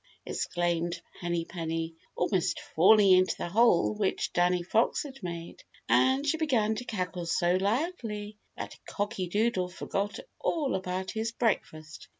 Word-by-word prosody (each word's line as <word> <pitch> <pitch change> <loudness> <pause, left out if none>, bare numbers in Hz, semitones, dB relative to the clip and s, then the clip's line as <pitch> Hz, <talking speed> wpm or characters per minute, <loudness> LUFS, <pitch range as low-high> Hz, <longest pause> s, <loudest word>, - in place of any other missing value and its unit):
exclaimed 175 0 -1 0.2
Henny 175 -1 -1
Penny, 165 -1 -3 0.2
almost 180 -1 0
falling 195 +4 +5
into 185 0 +4
the - - -4
hole 220 -1 +4
which 205 -2 -1
Danny 175 0 +2
Fox 220 +6 +1
had 270 -2 -10
made. 170 -2 -7 0.2
And 265 +2 +3
she 305 +2 +1
began 245 -9 +2
to 245 - -5
cackle 180 -6 -3
so 175 +2 +2
loudly 210 - -2 0.2
that - - -7
Cocky 205 -3 -2
Doodle 205 -1 +1
forgot 200 +3 -3 0.2
all 300 -6 0
about 185 0 -2
his 225 +1 -2
breakfast. 160 -9 -2
190 Hz, 140 wpm, -29 LUFS, 175-225 Hz, 0.2 s, falling